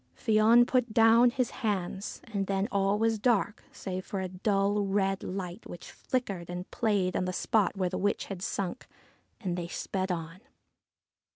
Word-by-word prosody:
Fion 225 +1 +5
put 250 -3 0
down 230 +2 +6
his 255 0 -1
hands, 195 -3 -2
and 195 -1 -1
then 195 +1 0
all 200 0 +2
was 225 0 +1
dark, 210 -2 +1
save 185 -1 -5
for 195 - -4
a 190 - -2
dull 200 +2 +1
red 195 -1 0
light 185 +1 -6
which 175 - -9
flickered 200 -10 -3
and 180 +1 -6
played 200 -5 +1
above 185 - 0
the 185 - -2
spot 210 +1 +1
where 185 -1 +1
the 185 - -3
witch 205 +1 0
had 195 -3 -7
sunk; 195 +4 -3 0.5
and 180 -5 -2
they 175 -1 -4
sped 185 +2 -3
on. 165 0 -5
195 Hz, 170 wpm, -29 LUFS, 185-220 Hz, 0.5 s, down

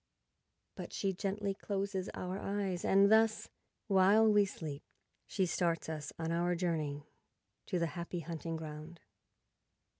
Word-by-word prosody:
But - - -8
she 195 -1 0
gently 200 +1 -2
closes 195 -1 -3
our 185 +2 -4
eyes, 195 -3 -2
and 200 +1 +5
thus, 220 0 +4 0.4
while 200 +2 +5
we 210 -1 +5
sleep, 155 -6 -6 0.5
she 190 - +1
starts 170 -2 0
us 150 -2 -4
on 165 0 -2
our 175 +1 +1
journey 155 -5 -2 0.6
to 185 - 0
the 170 - +1
Happy 170 +1 -4
Hunting 165 +1 -4
Ground. 155 +1 -8
180 Hz, 130 wpm, -34 LUFS, 165-200 Hz, 0.6 s, and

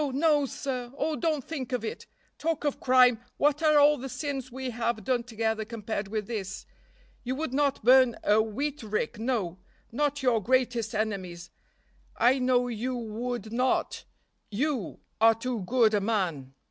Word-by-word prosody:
no! 295 0 +3
sir! 250 -1 -4
Oh, 305 +2 0
don't 310 -4 -1
think 265 -4 -5
of 250 - -2
it. 440 - -6 0.3
Talk 325 -1 -1
of 290 - -1
crime, 250 -2 +5 0.2
what 295 +1 +2
are 305 -2 +4
all 295 0 +5
the 265 +2 -6
sins 265 -1 -4
we 260 0 -4
have 230 -2 -2
done 245 +3 +1
together 220 -2 -2
compared 215 -2 -4
with 215 0 -3
this? 195 -4 -5 0.6
You 255 +1 -2
would 295 -2 -3
not 280 -3 +1
burn 255 0 +6
a 210 +1 +4
wheat 275 +7 -3
rick, 215 +1 -3
no, 220 -7 -2 0.3
not 290 +3 -1
your 240 -4 +3
greatest 240 -1 0
enemy's; 185 -5 -3 0.7
I 250 +4 +4
know 250 -1 +2
you 245 +2 -3
would 230 -1 -4
not, 250 +2 0 0.4
you, 250 - -2 0.2
are 225 0 +6
too 240 +1 -3
good 235 -2 +3
a 205 - +2
man. 175 - -2
245 Hz, 160 wpm, -28 LUFS, 220-265 Hz, 0.7 s, burn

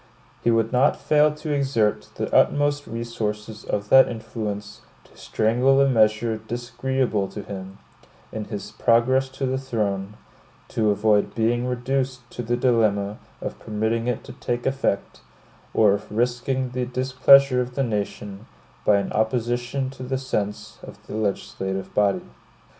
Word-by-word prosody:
He - - +3
would 115 -1 +2
not 130 +3 +3
fail 150 0 +4
to 150 0 -4
exert 135 -7 0
the - - -4
utmost 145 0 +3
resources 110 -2 -4
of 105 0 -3
that 135 0 +8
influence 105 -2 -5 0.2
to - - -23
strangle 125 +5 +2
a 140 - +5
measure 110 -2 +2
disagreeable 120 -1 -2
to 105 - -8
him, 95 0 -8 0.5
in 110 -1 -5
its 105 -3 -6
progress 130 +3 +2
to 135 +1 -4
the 130 0 -1
throne, 105 -6 -2 0.5
to 110 -2 +1
avoid 105 0 +2
being 120 +2 +1
reduced 125 0 -2
to - - -5
the 120 +1 -1
dilemma 110 -5 +1 0.2
of - - -5
permitting 110 +2 -1
it 125 -2 -1
to - - -10
take 120 0 -3
effect, 135 -7 -1 0.5
or 105 -3 +4
of 100 - -5
risking 125 +3 -1
the 125 0 -2
displeasure 130 +1 +5
of 125 0 -5
the 135 - +1
nation 105 -2 -4 0.4
by 105 - +4
an 100 -1 -1
opposition 120 +4 -1
to 135 - -13
the 130 +1 -2
sense 105 -6 -4
of - - -11
the - - -9
legislative 95 -2 -3
body. 100 -1 +1
115 Hz, 145 wpm, -24 LUFS, 105-130 Hz, 0.5 s, that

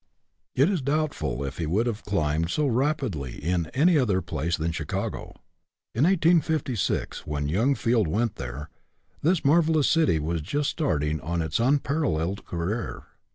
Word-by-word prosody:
It 135 +4 +4
is 185 -5 0
doubtful 140 - -1
if 70 +3 -6
he 80 - -1
would 100 +9 +1
have 115 -3 -3
climbed 80 -4 0
so 150 +10 +1
rapidly 125 - -1
in 85 +1 -1
any 160 +3 +4
other 105 -8 +2
place 85 -1 -2
than 80 +1 -1
Chicago. 80 -2 -4 0.6
In 125 +7 +2
1856, 160 - +1
when 75 -1 -2
young 115 - +2
Field 115 -6 +1
went 110 +6 -1
there, 65 +4 -6 0.5
this 170 +1 +1
mar 160 +5 +6
velous 155 -3 +2
city 160 - +3
was 80 +2 -2
just 145 - -1
starting 80 - 0
on 85 +4 -2
its 80 +4 -1
unpar 140 +5 +1
alleled 90 - -1
career. 85 - -3
105 Hz, 155 wpm, -26 LUFS, -, 0.6 s, mar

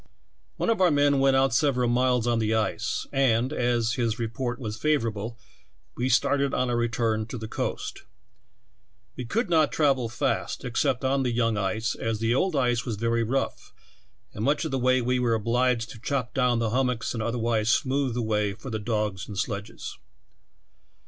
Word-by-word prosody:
One - - +1
of 220 - 0
our 180 - +6
men 145 -2 +3
went 135 0 +4
out 135 -2 +3
several 125 -2 +2
miles 125 0 +2
on 120 -1 +1
the 110 0 +1
ice, 110 +1 -1
and, 130 -1 +2
as 120 -3 +1
his 115 -2 -1
report 120 +1 -3
was 110 -5 -5
favorable, 115 -4 -1 0.6
we 125 +2 -1
started 140 +2 +2
on 125 -1 0
our - - +1
return 115 -2 0
to 125 - -6
the 110 -1 -6
coast. - - -4 1.1
We 125 - -5
could 220 - 0
not 160 -3 +3
travel 135 -6 +2
fast, 110 - -2
except 130 +1 0
on 135 +1 +2
the 125 -2 0
young 115 -1 +1
ice, 110 +3 -1
as 115 -1 -2
the 115 +2 +1
old 180 +6 +1
ice 125 -3 +1
was 115 - -3
very 115 +2 0
rough, 130 +4 -2 0.6
and 105 - -4
much 145 +5 +1
of 160 - -3
the 135 - 0
way 130 0 +3
we 125 +1 +1
were 120 -2 +2
obliged 115 +1 +1
to 115 - -12
chop 125 -2 -2
down 125 -2 +2
the 115 -2 0
hum 130 +2 +2
mocks 125 -2 -2
and 115 - -3
otherwise 115 -1 0
smooth 130 0 +1
the 120 - -1
way 105 -2 0
for 125 +6 -9
the 110 - -2
dogs 105 -3 -2
and 105 - -7
sledges. 105 -2 -4
120 Hz, 190 wpm, -26 LUFS, 115-130 Hz, 1.1 s, our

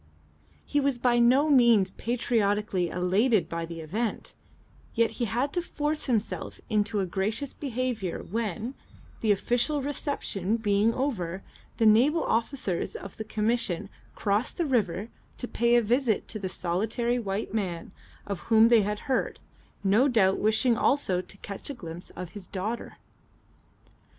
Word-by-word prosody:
He 290 - +1
was 280 -2 +1
by 240 0 +2
no 255 +5 +5
means 235 -8 +5
patriotically 210 -6 0
elated 190 +6 +2
by 165 0 -4
the 165 -1 -7
event, 210 +9 -3 0.6
yet 230 -1 +3
he 240 - -2
had 245 +7 -1
to 355 - +1
force 305 -2 -2
himself 225 -4 -2
into 210 -1 +1
a - - 0
gracious 210 +9 -2
behaviour 250 - -3
when, 225 +3 -3 0.5
the 220 - +2
official 245 +8 +1
reception 250 - -2
being 210 0 +2
over, 195 -9 -2 0.3
the 225 - +2
naval 255 +10 +5
officers 225 -5 -1
of 200 - -8
the 220 - -4
Commission 215 -4 -1 0.3
crossed 205 +4 0
the 345 - +1
river 220 - 0 0.3
to 245 - -3
pay 235 0 +2
a 240 - +4
visit 235 0 +1
to 215 - -3
the 190 -2 -3
solitary 225 +8 -1
white 200 -1 -3
man 185 -5 -3 0.3
of 200 -3 -4
whom 225 0 +6
they 235 -2 +6
had 210 +1 -2
heard, 265 - -1 0.5
no 210 +7 +4
doubt 205 -7 +3
wishing 220 +3 +3
also 195 -10 +2
to 190 +2 -9
catch 200 +5 -8
a 285 - -4
glimpse 170 -5 -9
of 180 -2 -6
his 200 -2 -10
daughter. 210 +5 -4
220 Hz, 150 wpm, -27 LUFS, 195-245 Hz, 0.6 s, whom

